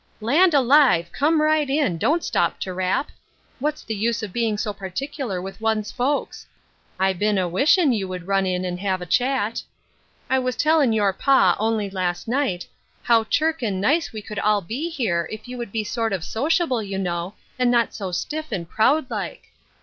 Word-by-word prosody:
" -, -, -37 dB
Land 300 Hz, +10 st, +3 dB
alive! 260 Hz, -, +4 dB
come 310 Hz, +3 st, +2 dB
right 305 Hz, -2 st, +2 dB
in, 270 Hz, -, +1 dB
don't 305 Hz, -, +1 dB
stop -, -, 0 dB
to 185 Hz, -, -3 dB
rap. 185 Hz, +9 st, -1 dB, 0.5 s
What's 300 Hz, +3 st, -2 dB
the 225 Hz, -, -4 dB
use 220 Hz, +1 st, -1 dB
of 200 Hz, -4 st, -6 dB
being 225 Hz, -3 st, 0 dB
so 210 Hz, 0 st, -2 dB
particular 200 Hz, -, -4 dB
with 195 Hz, +4 st, -8 dB
one's 220 Hz, -2 st, 0 dB
folks? 275 Hz, +4 st, -2 dB, 0.5 s
1 190 Hz, -1 st, +1 dB
been 210 Hz, -1 st, +2 dB
a 185 Hz, -1 st, +1 dB
wishin' 275 Hz, -, +3 dB
you 200 Hz, -4 st, -2 dB
would 180 Hz, -2 st, -6 dB
run 195 Hz, 0 st, +1 dB
in 180 Hz, 0 st, -1 dB
and 180 Hz, 0 st, -3 dB
have 190 Hz, -2 st, -1 dB
a -, -, -6 dB
chat. 245 Hz, +2 st, 0 dB, 0.7 s
I 265 Hz, -, +2 dB
was 255 Hz, -1 st, -2 dB
tellin' 305 Hz, -4 st, +3 dB
your 205 Hz, -3 st, +2 dB
pa, 195 Hz, -6 st, +4 dB
only 220 Hz, -1 st, 0 dB
last 180 Hz, -2 st, -3 dB
night, 235 Hz, -8 st, -1 dB, 0.4 s
how 230 Hz, -2 st, +3 dB
chirk 320 Hz, +5 st, 0 dB
and 205 Hz, -5 st, -1 dB
nice 295 Hz, -, +1 dB
we 215 Hz, -2 st, -7 dB
could 210 Hz, -1 st, -6 dB
all 210 Hz, 0 st, +2 dB
be 250 Hz, -, -4 dB
here, 205 Hz, -, -1 dB
if 215 Hz, +2 st, -8 dB
you 250 Hz, -, -7 dB
would 235 Hz, -4 st, -5 dB
be 220 Hz, 0 st, -1 dB
sort 225 Hz, 0 st, -2 dB
of 185 Hz, -4 st, -2 dB
sociable, 280 Hz, -, 0 dB
you 195 Hz, -2 st, -4 dB
know, 180 Hz, +1 st, -3 dB, 0.2 s
and 250 Hz, -1 st, +3 dB
not 240 Hz, -1 st, +2 dB
so 195 Hz, -4 st, -5 dB
stiff 305 Hz, -, -3 dB
and 170 Hz, -3 st, -3 dB
proud 260 Hz, -, +2 dB
like. -, -, -5 dB
220 Hz, 195 wpm, -23 LUFS, 190-275 Hz, 0.7 s, alive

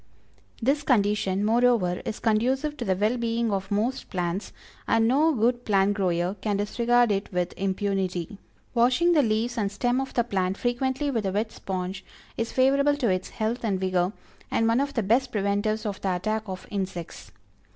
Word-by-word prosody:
This 280 Hz, +4 st, +2 dB
condition, 210 Hz, -6 st, +1 dB
moreover, 225 Hz, -6 st, +2 dB
is 215 Hz, -, -3 dB
conducive 260 Hz, +7 st, +1 dB
to 240 Hz, -, -4 dB
the 190 Hz, -, +1 dB
well 210 Hz, +6 st, +1 dB
being 230 Hz, -1 st, 0 dB
of 195 Hz, -1 st, -2 dB
most 220 Hz, +6 st, -1 dB
plants, 180 Hz, +2 st, -3 dB, 0.4 s
and 225 Hz, 0 st, +3 dB
no 295 Hz, +6 st, +4 dB
good 240 Hz, -1 st, +1 dB
plant 200 Hz, -2 st, +2 dB
grower 180 Hz, -2 st, 0 dB
can 205 Hz, -2 st, 0 dB
disregard 235 Hz, +3 st, +2 dB
it 200 Hz, +1 st, -2 dB
with 180 Hz, -1 st, -1 dB
impunity. 195 Hz, -1 st, -2 dB, 0.3 s
Washing 255 Hz, +9 st, +3 dB
the 305 Hz, -, +5 dB
leaves 230 Hz, 0 st, 0 dB
and 200 Hz, -2 st, 0 dB
stem 245 Hz, +5 st, 0 dB
of 270 Hz, -, -6 dB
the 240 Hz, -, +3 dB
plant 190 Hz, -4 st, -1 dB
frequently 260 Hz, +4 st, -1 dB
with 225 Hz, -6 st, -1 dB
a -, -, 0 dB
wet 215 Hz, +3 st, -1 dB
sponge, 185 Hz, 0 st, -5 dB, 0.3 s
is 230 Hz, 0 st, -2 dB
favorable 280 Hz, +2 st, +3 dB
to 250 Hz, -6 st, +1 dB
its 185 Hz, 0 st, -1 dB
health 225 Hz, +3 st, -2 dB
and 200 Hz, -4 st, 0 dB
vigor, 185 Hz, -1 st, +1 dB, 0.4 s
and 225 Hz, -, +1 dB
one 230 Hz, +2 st, +3 dB
of 280 Hz, 0 st, -2 dB
the 230 Hz, -, +1 dB
best 245 Hz, +6 st, +2 dB
preventives 210 Hz, +1 st, 0 dB
of 200 Hz, -2 st, -4 dB
the 190 Hz, -2 st, 0 dB
attack 215 Hz, +3 st, -2 dB
of 185 Hz, 0 st, -6 dB
insects. 185 Hz, -, -5 dB
215 Hz, 180 wpm, -26 LUFS, 195-245 Hz, 0.4 s, the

